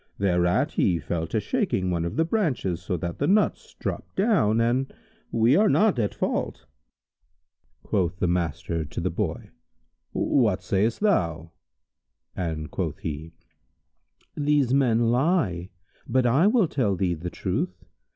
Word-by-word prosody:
thereat 90 - +2
he 90 -3 +2
fell 80 +1 -3
to - - -1
shaking 95 -1 -1
one 85 -1 0
of 85 - -4
the 160 - +2
branches, 140 - -1
so 90 0 -2
that 85 +1 -5
the 145 - +1
nuts 210 +4 +1
dropped - - -5
down, 190 - +2
and 125 +4 +1 0.4
we 115 +4 +4
are 210 +4 +4
not 210 - +3
at 105 -3 +1
fault." - - -2 1.2
Quoth 90 -4 -1
the 90 - 0
master 85 -2 -1
to 75 - -6
the - - -1
Boy, - - -3 0.6
"What 105 -8 +1
sayst 100 - 0
thou?"; 85 - +1 0.8
and 80 -5 -4
quoth - - -3
he, 80 +1 -6 1.0
"These 145 -3 +2
men 120 -4 +3
lie; 125 - +1 0.4
but 130 +1 +2
I 135 +10 +4
will 220 -4 +3
tell 110 -10 0
thee 90 -1 0
the 85 +2 -5
truth. 90 -1 -3
100 Hz, 140 wpm, -25 LUFS, 85-135 Hz, 1.2 s, we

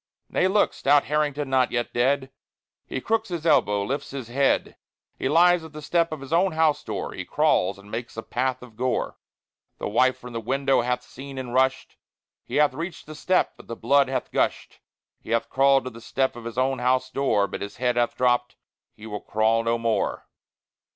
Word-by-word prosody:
Nay, 185 - +2
look! 205 +2 +2
Stout 145 +1 +3
Harrington 150 -1 -1
not 130 -1 +3
yet 120 -1 -2
dead!_ 130 +2 +1 0.6
He - - -3
crooks 225 - 0
his 170 -3 -4
elbow, 105 -10 +3
lifts 135 +7 -3
his 130 -4 -7
head. 135 +3 +1 0.4
He 130 - 0
lies 175 +2 +5
at 160 -1 -11
the 155 - -8
step 170 +1 +1
of 155 -3 -5
his 135 +3 -6
own 180 +2 +3
house 155 -2 +2
door; - - -4
He - - -5
crawls 95 +2 +1
and 100 +1 -15
makes 115 0 -5
a 115 - -4
path 130 0 -2
of 120 -3 -14
gore. 125 +2 -2 0.6
The - - -4
wife 130 +5 +3
from 125 0 -10
the 115 - -3
window 135 +3 +1
hath 125 +1 -1
seen, 135 +2 -10
and 125 -2 -5
rushed; 130 +1 +1 0.5
He - - -7
hath 150 -2 +4
reached 165 +4 -6
the 155 - -9
step, 185 +4 +1
but - - -15
the 115 - -5
blood 140 +2 +3
hath 130 -2 -3
gushed; - - -1 0.4
He - - -14
hath 115 0 0
crawled 135 0 +4
to 130 - -6
the 115 0 -12
step 130 +2 -1
of 120 -1 -10
his 115 +1 -6
own 130 +1 +1
house 130 +1 +1
door, 120 -7 +2
But 100 - -6
his 100 - -6
head 125 0 +1
hath 120 -1 0
dropped: 125 -1 +1 0.4
he 110 - -12
will 105 -2 -5
crawl 110 +1 +1
no 115 +1 +1
more. 115 -1 -1
130 Hz, 205 wpm, -25 LUFS, 120-145 Hz, 0.6 s, lies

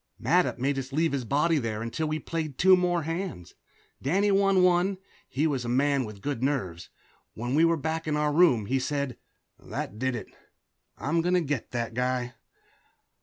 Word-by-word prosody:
Mattup - - +2
made 135 +2 0
us 135 0 -6
leave 160 +3 +1
the 140 -2 -2
body 150 +6 +2
there 110 -3 -3
until 155 +7 -2
we 155 - -1
had 155 - -6
played 155 -5 -3
two 185 0 +7
more 175 -2 +1
hands. 165 - -5 0.5
Danny 195 +9 +2
won 195 -1 +4
one; 180 +2 +3 0.3
he 145 +5 0
was 140 -5 0
a 120 - -4
man 135 +1 +2
with 105 -2 -10
good 140 -5 -2
nerves. 95 - -2 0.5
When 120 +3 -3
we 160 +3 +5
were 165 0 +2
back 160 +2 -3
in 150 -1 0
our 150 0 +1
room 145 - +4
he 130 +5 0
said, 140 -2 -2 0.4
"That 105 - -6
did 130 0 0
it 110 - -8 0.6
I'm 165 +4 0
going 180 +2 +1
to 180 - +3
get 145 -6 -3
that 115 -2 -3
guy." 125 0 -1
145 Hz, 190 wpm, -27 LUFS, 125-165 Hz, 0.6 s, two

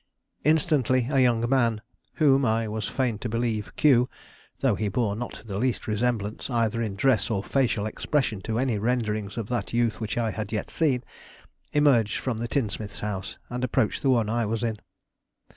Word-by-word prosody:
Instantly 145 -5 +2
a 135 - +3
young 120 -2 +3
man, 120 -4 +2 0.4
whom 140 -3 +4
I 115 -1 +1
was 105 -2 -3
fain 120 -6 -1
to 120 - -4
believe 115 -2 -1
Q, 130 -4 +4 0.5
though - - +3
he 105 - -1
bore 100 0 0
not 120 0 -6
the 100 -2 -4
least 125 0 0
resemblance, 110 0 -1
either 115 -2 +1
in 105 -4 -2
dress 125 +2 +2
or 100 -3 -1
facial 120 -6 +1
expression 110 -2 -1
to 110 +4 -2
any 120 -4 +1
renderings 110 -3 -1
of 115 -3 -3
that 120 -4 -2
youth 115 -1 +1
which 105 -1 -3
I 115 -2 +1
had 105 -1 -5
yet 110 - -3
seen, 135 -6 +1 0.7
emerged 130 -8 +3
from 120 -4 -2
the 120 - -2
tinsmith's 110 -5 -2
house, 95 -2 -4
and 125 +1 -4
approached 115 -3 +1
the 135 - +2
one 115 -4 +3
I 115 +2 0
was 115 +2 -2
in. 115 -2 -1
115 Hz, 180 wpm, -26 LUFS, 110-125 Hz, 0.7 s, whom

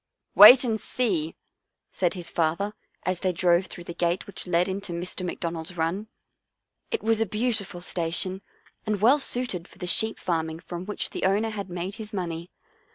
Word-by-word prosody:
" - - -59
Wait 255 +1 +10
and 225 -3 -1
see," 185 -11 -1 0.6
said 180 -1 0
his 175 -2 -4
father 170 +6 0 0.3
as 185 -1 -1
they 185 - 0
drove 175 +1 +2
through 175 - -10
the 170 - -7
gate 175 +1 -1
which 200 - -10
led 175 0 +2
into 195 -1 -5
Mr. 180 +2 -4
McDon 170 -1 -3
ald's 165 +2 -7
run. 170 +7 -1 0.8
It 455 - -2
was 225 0 +2
a - - +3
beautiful 210 -4 -2
station 180 +2 -1 0.4
and 210 -2 -1
well 250 +8 +5
suited 245 -10 -1
for - - -18
the - - -6
sheep 220 +5 +4
farming 160 -1 -2
from 180 +1 -7
which 210 - -4
the - - -5
owner 210 +4 +1
had 200 -3 -6
made 180 +2 -4
his 215 0 -9
money. 170 -3 -4
185 Hz, 185 wpm, -26 LUFS, 170-210 Hz, 0.8 s, Wait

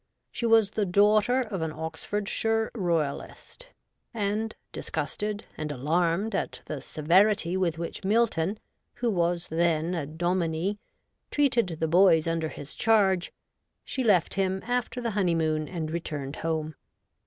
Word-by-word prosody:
She 235 -1 -2
was 225 -3 +5
the 210 -2 -1
daughter 210 +6 +4
of 205 -8 -4
an 160 -1 -1
Oxfordshire 205 +7 -2
Royalist, 175 - -3 0.5
and, 215 +1 -1 0.2
disgusted 210 0 -3
and 155 -1 -3
alarmed 170 - 0
at 195 - -3
the 145 -3 -5
severity 180 +5 +2
with 175 -4 0
which 170 +3 -5
Milton, 205 -3 +1 0.4
who 240 -2 0
was 175 -2 0
then 165 +1 +1
a 160 -5 -2
dominie, 175 +4 -1 0.5
treated 235 - +1
the 160 - +1
boys 165 -1 +5
under 165 -1 -1
his 145 - -8
charge, 195 -5 +2 0.5
she 260 - -2
left 200 -7 +3
him 190 0 0
after 245 +1 -1
the 235 -1 -1
honeymoon 165 -6 +1
and 160 -4 -4
returned 150 -4 -4
home. 160 -1 -2
180 Hz, 130 wpm, -27 LUFS, 160-210 Hz, 0.5 s, was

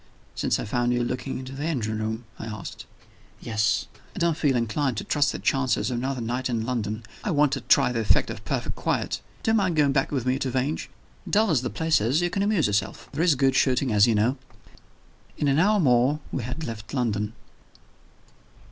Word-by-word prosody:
"Since - - 0
I - - -3
found 120 +3 0
you 120 0 +1
looking 125 +2 -3
into 130 0 -7
the 140 +3 -4
engine 110 -9 -2
room?" 110 +2 -3 0.2
I 115 - -6
asked. 105 -4 -7 0.5
"Yes. 110 -2 0 0.3
I - - -10
don't 170 -2 +2
feel 145 -4 +1
inclined 120 +2 0
to - - -2
trust 145 0 +2
the - - -4
chances 130 -2 +1
of 120 - -1
another 130 0 -2
night 125 +3 -2
in 115 -2 -1
London. 115 -3 -2 0.2
I - - -2
want 150 -4 +3
to 135 - -2
try 125 +2 +4
the 120 - -1
effect 110 - +2
of - - -8
perfect - - -2
quiet. - - -1 0.2
Do 225 - +2
you - - +3
mind 190 -6 +2
going 145 -2 +4
back 135 -1 +1
with 130 -4 -1
me 130 +1 +1
to 135 - -1
Vange? 130 +5 -2 0.4
Dull 215 -1 +3
as 140 -7 +3
the - - -2
place 160 -6 +1
is, 125 +8 +2
you 175 0 0
can 195 - -1
amuse 205 -6 +2
yourself. 100 -1 -1
There 145 - -2
is 170 -5 +4
good 135 0 +3
shooting, 130 -2 +2
as 105 +2 +6
you 115 - +3
know." 115 +6 +2 1.0
In 145 - 0
an 140 +2 +3
hour 205 +4 +4
more 130 -1 +3
we 135 - -2
had 125 +7 -5
left 110 -2 -6
London. 105 -4 -1
130 Hz, 215 wpm, -25 LUFS, 115-145 Hz, 1.0 s, as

